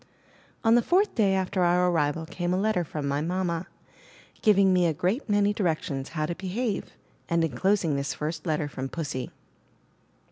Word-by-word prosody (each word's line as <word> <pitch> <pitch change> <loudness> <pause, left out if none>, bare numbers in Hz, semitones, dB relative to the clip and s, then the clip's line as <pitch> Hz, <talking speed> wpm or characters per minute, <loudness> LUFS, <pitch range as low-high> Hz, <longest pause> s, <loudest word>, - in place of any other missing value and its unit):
On 225 -1 +5
the 240 - +6
fourth 380 - +2
day 200 -4 +2
after 185 0 -1
our 180 +1 +3
arrival 160 0 0
came 175 +1 -2
a - - 0
letter 210 -3 +1
from 150 -2 -4
my 140 +1 0
mamma, 175 +1 -2 0.7
giving 200 -3 +5
me 180 -1 +3
a 160 - +1
great 190 - -1
many 205 0 +3
direc 175 -7 0
tions 135 -5 -4
how 155 - +1
to 170 - -2
behave, 195 +5 -3 0.3
and 170 -1 +2
enclosing 175 -1 +1
this 140 0 -2
first 155 +4 -4
letter 155 -1 0
from 135 -2 -5
Pussy. 145 -6 -4
175 Hz, 175 wpm, -27 LUFS, 155-195 Hz, 0.7 s, the